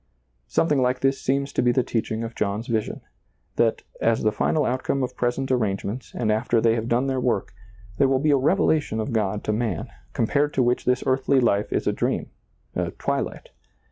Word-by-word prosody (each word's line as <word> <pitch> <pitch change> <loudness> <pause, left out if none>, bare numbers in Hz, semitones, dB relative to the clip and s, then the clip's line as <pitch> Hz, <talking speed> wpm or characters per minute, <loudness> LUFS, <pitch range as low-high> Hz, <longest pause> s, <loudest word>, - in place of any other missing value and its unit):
Something 145 - +2
like 125 0 +1
this 135 0 +1
seems 140 +1 0
to - - +1
be 125 -1 +3
the 125 +1 +2
teaching 115 -1 -2
of 115 0 -5
John's 105 +2 -2
vision, 110 -3 -2 0.3
— - - -44
that, 115 -1 +2 0.2
as 115 0 +2
the 110 - +3
final 150 +7 +1
outcome 130 +2 0
of 125 - -4
present 125 +2 -1
arrangements 110 0 -1
and 110 -3 0
after 115 +2 +2
they 115 0 +3
have 115 0 -2
done 120 +3 +2
their 135 -1 0
work, 105 -6 -1 0.5
there 135 - +5
will 135 0 +2
be 150 +3 +2
a - - +5
revelation 150 - +2
of 110 +3 -3
God 105 -2 0
to 105 - 0
man, 110 -5 -2 0.2
compared 145 +6 +1
to 130 - +3
which 120 +1 +1
this 125 0 +2
earthly 130 +1 +2
Hfe 105 -4 +1
is - - 0
a - - +1
dream, - - -1 0.4
a - - -1
twilight. - - -3
120 Hz, 205 wpm, -24 LUFS, 110-135 Hz, 0.5 s, there